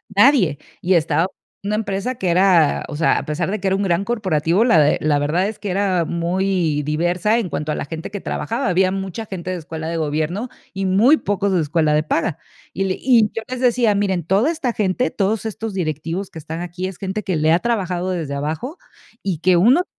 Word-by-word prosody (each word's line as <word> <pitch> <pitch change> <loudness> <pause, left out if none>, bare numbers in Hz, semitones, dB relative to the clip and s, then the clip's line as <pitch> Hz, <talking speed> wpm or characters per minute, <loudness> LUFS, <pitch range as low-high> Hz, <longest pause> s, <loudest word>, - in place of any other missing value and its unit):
nadie". 205 - +5 0.2
Y 185 +1 +2
estaba 165 0 +2 0.4
en 200 - -3
una 210 - +1
empresa 210 +3 -2
que 190 -6 -2
era, 175 -3 +4
o 145 - -5
sea, 165 - +3
a - - -7
pesar 160 +2 -2
de 210 +2 -2
que 195 - -1
era 190 0 +2
un 200 - -1
gran 180 -1 +1
corporativo, 190 -4 +1
la 225 -10 +5
de 150 0 +4
la 150 -1 +2
verdad 155 +7 +1
es 215 - -6
que 205 - -4
era 185 -2 +1
muy, 170 -2 0
diversa 175 +8 +1
en 220 - -2
cuanto 150 0 -3
a - - -1
la - - -4
gente 160 +5 -7
que 205 - -4
trabajaba. 150 - -3
Había 185 +1 +2
mucha 195 +2 -4
gente 185 -3 -5
de 185 - -2
escuela 160 -1 -6
de 165 - -3
gobierno 160 +8 -2 0.2
y 195 0 -2
muy 205 +10 +5
pocos 200 -4 -1
de 180 - +2
escuela 155 0 +1
de 150 +1 +2
paga. 160 0 -1 0.4
Y 195 - -1
le 190 -1 0
y 235 -5 +4
yo 225 - -4
les 255 0 -5
decía: 240 -4 +3
"Miren, 190 -3 0
toda 200 - +2
esta 285 -8 -2
gente, 210 +5 0
todos 210 +2 -1
estos 220 0 -4
directivos 165 +2 -3
que 160 - -9
están 160 +2 -6
aquí, 175 +1 -4
es 190 -2 -8
gente 195 +2 -4
que 185 -4 -1
le 155 +1 +3
ha 170 - +4
trabajado 185 -5 -1
desde 160 -6 -3
abajo 160 - -4 0.5
y 190 -4 -1
que 180 +2 +3
uno 235 - +5
va - - -32
185 Hz, 230 wpm, -20 LUFS, 165-205 Hz, 0.5 s, nadie